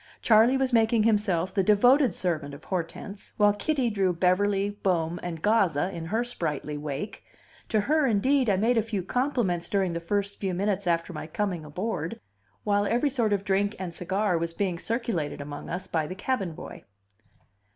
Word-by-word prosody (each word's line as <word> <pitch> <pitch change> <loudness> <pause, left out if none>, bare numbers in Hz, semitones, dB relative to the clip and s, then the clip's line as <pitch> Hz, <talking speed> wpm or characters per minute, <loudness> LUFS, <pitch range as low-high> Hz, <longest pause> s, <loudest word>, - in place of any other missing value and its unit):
Charley 230 +4 +5
was 265 -1 0
making 225 -1 +4
himself 205 -5 +1
the 195 - +2
devoted 245 +6 +5
servant 155 -6 -2
of 145 - -14
Hortense, 190 +3 -5
while 205 -1 +5
Kitty 255 +3 0
drew 195 -3 +1
Beverly, 195 +3 +2
Bohm, 175 -2 0
and 165 -3 -6
Gazza 190 -6 +2
in 165 -3 -6
her 220 +8 0
sprightly 155 - -3
wake. 145 +6 -5 0.5
To 215 -2 +2
her, 300 +5 +2
indeed, 255 +3 +2
I 200 - +4
made 230 +4 +3
a - - +3
few 210 -4 -3
compliments 240 -7 -1
during 190 -3 +1
the 170 - -2
first 200 +3 -2
few 190 -3 -2
minutes 200 0 -1
after 170 +1 0
my 155 - -6
coming 180 -1 -2
aboard, 170 +1 -4 0.4
while 205 0 +1
every 245 +6 +1
sort 235 -5 0
of 200 -1 +1
drink 200 +2 +1
and 180 -3 -5
cigar 185 +1 0
was 165 0 -3
being 185 -4 -1
circulated 210 - -2
among 145 0 -7
us 180 +2 -4
by 160 -4 -1
the 185 - -6
cabin 200 -4 -2
boy. - - -10
195 Hz, 180 wpm, -27 LUFS, 170-220 Hz, 0.5 s, Charley